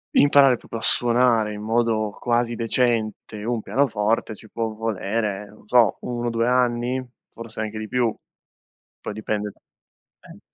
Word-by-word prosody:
imparare 140 -3 +6
proprio 115 - -8
a - - -11
suonare 120 -3 +3
in 105 - -7
modo 110 -1 +1
quasi 120 -1 0
decente 115 -2 -1
un 115 0 -1
pianoforte 110 -4 0
ci 110 +1 -15
può 115 +1 -2
volere, 105 -1 -2
non 105 +1 -19
so, 120 -1 +4
1, 120 -1 -3
due 115 0 0
anni? 125 +1 +1 0.2
Forse 115 -1 -8
anche 110 0 -4
di 110 0 -5
più, 120 0 +1 0.9
poi - - -5
dipende 105 -1 -3
da - - -24
eh - - -16
115 Hz, 150 wpm, -23 LUFS, 110-120 Hz, 0.9 s, imparare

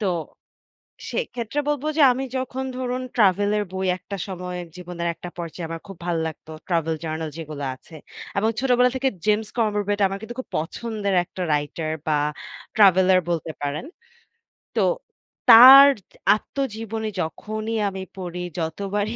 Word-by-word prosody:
তো 210 - -1 1.1
সেইক্ষেত্রে 245 - -3
বলব 295 -2 -1
যে, - - +4
আমি 255 +2 -2
যখন 260 0 -3
ধরুন 255 0 -2
ট্রাভেলের 205 0 +3
বই 190 0 -2
১ 180 - -31
টা 200 - -2
সময় 180 -1 -5 0.2
জীবনের 175 -1 -5
১ 165 - -27
টা - - -4
পর্যায়ে 170 0 -5
আমার 165 0 -5
খুব 195 -2 -10
ভালো 170 -2 0
লাগতো, 160 0 -9 0.2
travel 165 -2 0
journal 160 0 -3
যেগুলো 155 -3 -6
আছে। 160 +5 -16 0.4
এবং 215 +3 +2
ছোটবেলা 250 -1 +3
থেকে 265 +1 +1 0.2
James 215 0 +1
Corbett 205 -2 0
আমার 195 +1 -4
কিন্তু 235 +2 -8
খুব 260 - -7
পছন্দের 200 +4 -2
একটা 185 - -9
রাইটার 150 +2 -2 0.2
বা 150 -1 +2 0.6
ট্রাভেলার 190 -3 +6
বলতে 165 -2 -2
পারেন। 145 - -3 0.9
তো - - +2 0.7
তার 260 +4 +11 0.5
আত্মজীবনী 220 -3 -4
যখনই 215 +7 -4
আমি 190 -1 -6 0.2
পড়ি, 180 -1 -5 0.2
যতবারই 200 +6 -2
200 Hz, 145 wpm, -23 LUFS, 170-225 Hz, 1.1 s, তার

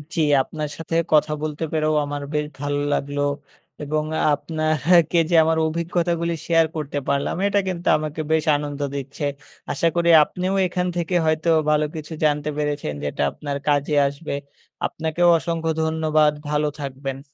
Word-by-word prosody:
জি 165 - +1 0.2
আপনার 150 +2 -5
সাথে 165 0 -4 0.2
কথা 150 0 +4
বলতে 155 0 -3
পেরেও 155 -1 +1
আমার 145 0 -4
বেশ 150 0 0
ভালো 145 0 -1 0.2
লাগলো 145 +1 -2 0.6
এবং 150 +1 -1
আ - - 0 0.2
আপনাকে 155 +2 +2
যে 175 - +2
আমার 160 0 +1
অভিজ্ঞতাগুলি 170 +1 -1
শেয়ার 165 -1 +4
করতে 150 -2 -4
পারলাম, 140 0 0
এটা 200 0 +2
কিন্তু 175 -2 -4
আমাকে 155 0 -4
বেশ 160 -1 +2
আনন্দ 145 0 -4 0.2
দিচ্ছে। 140 +2 -6 0.5
আশা 165 +4 +1
করি 170 0 +2
আপনিও 180 +5 -3
এখান 180 0 -1
থেকে 175 +1 -1
হয়তো 155 +1 +1 0.2
ভালো 150 0 +3
কিছু 155 +1 -6
জানতে 150 0 +1
পেরেছেন 145 - -2
যেটা 70 0 -3
আপনার 145 -1 -5
কাজে 145 0 +1
আসবে। 140 +3 -5 0.5
আপনাকেও 160 +2 0
অসংখ্য 165 -1 -2
ধন্যবাদ, 155 -1 +2 0.2
ভালো 150 0 +1
থাকবেন। 135 -1 -5
155 Hz, 150 wpm, -22 LUFS, 145-165 Hz, 0.6 s, কথা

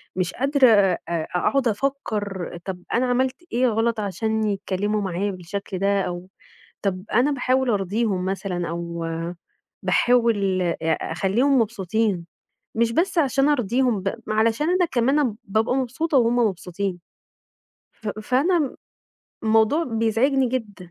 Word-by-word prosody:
مش 180 -1 -1
قادرة 275 0 +3
أ 200 -5 +4
أقعد 180 - 0
أفكر 205 -7 -2
طب 180 -2 -5
أنا 250 +2 +2
عملت 255 +1 +1 0.2
إيه 250 +1 +3
غلط 225 0 +1
عشان 220 +2 -1
يتكلموا 205 0 -1
معايا 195 +2 -1
بالشكل 185 +1 -6
ده، 200 0 +2
أو 180 0 -5 0.5
طب 190 -1 -2
أنا 255 +6 +3
باحاول 255 -1 +1
أرضيهم 200 -1 0
مثلًا 185 -2 -2
أو 170 0 -4 0.8
باحاول 215 -6 +2
أ 170 -1 0 0.4
أخليهم 240 +11 +2
مبسوطين 205 -4 -1 0.5
مش 230 0 +2
بس 345 +7 0
عشان 275 -1 +3
أرضيهم 245 -3 +1
ب 195 - -1
ما 215 - -1
علشان 230 +8 +2
أنا 360 0 +3
كمان 260 -3 +1
بابقى 220 +5 +1
مبسوطة 270 +4 0
وهُم 235 0 +3
مبسوطين، 195 -4 -1 0.9
ف 215 - -8
فأنا 270 - 0 0.7
الموضوع 225 +9 +3
بيزعجني 240 +3 +1
جدًا. 205 -8 -5
220 Hz, 125 wpm, -23 LUFS, 195-255 Hz, 0.9 s, أ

